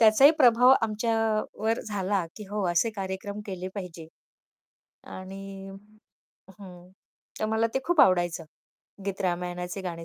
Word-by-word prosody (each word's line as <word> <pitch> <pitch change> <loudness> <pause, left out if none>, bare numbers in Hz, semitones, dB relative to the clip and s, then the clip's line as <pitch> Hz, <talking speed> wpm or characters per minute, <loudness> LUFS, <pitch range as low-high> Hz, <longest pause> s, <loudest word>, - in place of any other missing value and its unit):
त्याचाही 225 +6 +7
प्रभाव 250 -1 +7
आमच्यावर 225 0 0
झाला, 195 -3 -1
की 215 - -8
हो 210 -1 -2
असे 175 +7 +2
कार्यक्रम 195 +2 -5
केले 185 -1 -5
पाहिजे 175 -5 -7 1.1
आणि 195 +1 -8 0.9
हं, 180 -2 -12 0.5
तर - - +1
मला 220 +1 +1
ते - - +3
खूप 345 -3 +3
आवडायचं 175 -2 +3 0.6
गीत-रामायणाचे 180 -1 -3
गाणे 170 -2 -5
195 Hz, 115 wpm, -27 LUFS, 180-220 Hz, 1.1 s, त्याचाही